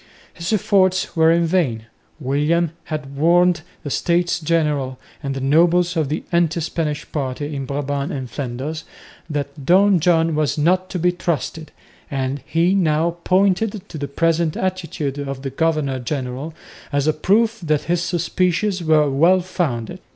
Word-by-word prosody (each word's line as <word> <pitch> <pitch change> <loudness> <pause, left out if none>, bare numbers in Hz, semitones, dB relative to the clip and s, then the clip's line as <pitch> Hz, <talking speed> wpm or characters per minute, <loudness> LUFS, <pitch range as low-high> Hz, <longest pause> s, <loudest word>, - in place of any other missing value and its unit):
His 170 +2 -4
efforts 190 -3 +2
were 160 0 +5
in 170 0 +3
vain. 150 -11 0 0.3
William 150 +4 +1
had 150 -3 -5
warned 170 +3 +3 0.2
the 145 - -5
States 175 +2 +1
General 150 -5 0 0.2
and 135 -2 -3
the - - -3
nobles 170 +6 +3
of 155 -4 0
the 155 - -2
anti 170 -1 +2
Spanish 150 -2 -2
party 145 +1 -3
in 135 -1 -3
Brabant 140 0 -2
and 130 -2 -4
Flanders 140 +5 -5 0.5
that 145 -1 -4
Don 190 +4 +5
John 165 -1 +3
was 150 -2 0
not 185 +5 +2
to - - -3
be 180 +1 +2
trusted, 165 -2 -3 0.4
and 135 0 -2
he 170 +3 +2
now 170 -2 +1
pointed 195 +2 +1
to - - -7
the 140 - -3
present 165 +1 0
attitude 165 -7 -3
of 135 -1 -5
the 135 - -3
governor 150 -3 0
general, 135 +3 -4 0.4
as 145 -1 +1
a 155 - +3
proof 220 +8 +2
that 155 -3 0
his 175 0 0
suspicions 180 +2 0
were 155 -2 +4
well 165 +7 +4
founded. 150 - -3
160 Hz, 155 wpm, -20 LUFS, 140-175 Hz, 0.5 s, were